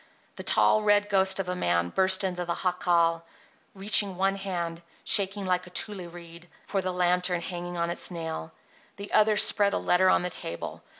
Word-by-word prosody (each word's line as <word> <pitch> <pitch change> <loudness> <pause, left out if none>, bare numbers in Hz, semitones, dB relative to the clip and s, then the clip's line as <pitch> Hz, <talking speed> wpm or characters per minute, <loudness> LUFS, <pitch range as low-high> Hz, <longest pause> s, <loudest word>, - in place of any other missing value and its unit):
The - - -7
tall, 215 - +3
red 205 0 +2
ghost 190 -1 +2
of 190 - -3
a 180 - -2
man 85 - 0
burst 190 - +2
into 180 -2 -2
the 170 -1 -3
jacal, 170 -2 +1 0.5
reaching 200 0 +3
one 195 +1 +1
hand, 175 -4 -5 0.2
shaking 200 0 +2
like 180 -1 -1
a - - -10
tule 185 -1 -5
reed, 170 0 -13 0.2
for 195 - -2
the 185 0 -3
lantern 180 0 +1
hanging 175 0 -6
on 170 0 -1
its - - -4
nail. 160 - -6 0.4
The 200 0 -9
other 215 0 +4
spread 200 -1 +3
a - - +1
letter 185 +1 +2
on - - +3
the 180 - -3
table. 85 - -6
180 Hz, 185 wpm, -27 LUFS, 170-195 Hz, 0.5 s, other